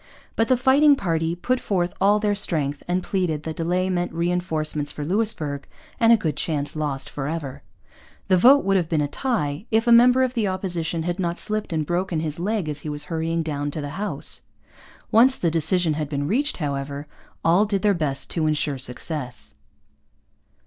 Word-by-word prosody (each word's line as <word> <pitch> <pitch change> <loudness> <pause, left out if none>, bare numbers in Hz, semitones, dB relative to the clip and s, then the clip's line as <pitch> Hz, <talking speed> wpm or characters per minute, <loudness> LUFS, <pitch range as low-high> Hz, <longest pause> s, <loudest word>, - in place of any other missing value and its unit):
But 225 - +1
the 255 - +3
fighting 280 +3 +5
party 165 -6 -1
put 250 +8 -1
forth 180 -6 -1
all 205 +2 +5
their 210 -1 +1
strength 150 -8 -1
and 180 +1 0
pleaded 175 -7 -1
that 160 -1 -5
delay 180 +3 0
meant 175 -1 -1
reinforcements 165 -3 -1
for 145 - -6
Louisbourg 160 -7 -1 0.3
and 230 0 +5
a 230 - +7
good 160 -9 -2
chance 150 -1 -2
lost 145 -3 -3
for 135 -1 -5
ever. 150 -4 -5 0.7
The 185 - +4
vote 260 +10 +6
would 195 0 +3
have 170 -3 -1
been 160 -3 +1
a 145 - 0
tie 195 - -2
if 225 0 +2
a 240 - +3
member 250 +2 +6
of 255 -1 -1
the 225 -5 0
Opposition 175 -3 -1
had 175 +2 -3
not 170 -2 -1
slipped 215 -2 -2
and 155 -2 -1
broken 175 0 -1
his 155 0 -4
leg 200 -1 -1
as 150 -1 -4
he 150 - -6
was 145 0 -4
hurrying 165 +1 -1
down 145 -2 -3
to 150 - -5
the 145 -1 -4
House. 210 - -2 0.7
Once 255 +4 +5
the 170 - 0
decision 165 +1 +4
had 150 -1 -3
been 145 -1 -2
reached, 280 - 0
however, 140 -1 -4 0.4
all 175 +6 +4
did 200 -1 -1
their 205 -1 +4
best 145 -6 -2
to 160 -2 0
ensure 150 -2 0
success. 125 0 -3
170 Hz, 190 wpm, -23 LUFS, 150-205 Hz, 0.7 s, a